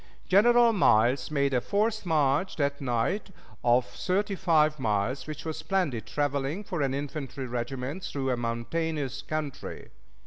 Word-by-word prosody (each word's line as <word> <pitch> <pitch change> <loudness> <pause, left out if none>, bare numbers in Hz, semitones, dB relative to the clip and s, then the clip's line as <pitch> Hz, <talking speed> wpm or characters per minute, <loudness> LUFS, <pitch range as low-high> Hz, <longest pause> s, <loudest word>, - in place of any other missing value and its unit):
General 235 +4 +5
Miles 125 - +3
made 140 -2 +1
a 125 - +2
forced 215 - 0
march 150 +2 +2
that 140 -1 -1
night 125 - -1 0.3
of 120 +1 +4
thirty 200 +8 -1
five 155 -5 +2
miles, 115 +4 -1
which 155 0 -7
was 160 -1 -3
splendid 150 - -1
traveling 145 - -1
for 175 -5 -3
an 135 -1 0
infantry 140 -1 -5
regiment 125 +6 -4
through 135 -6 -2
a - - +2
mountainous 135 +4 -2
country. 150 -1 -5
145 Hz, 140 wpm, -28 LUFS, 130-170 Hz, 0.3 s, General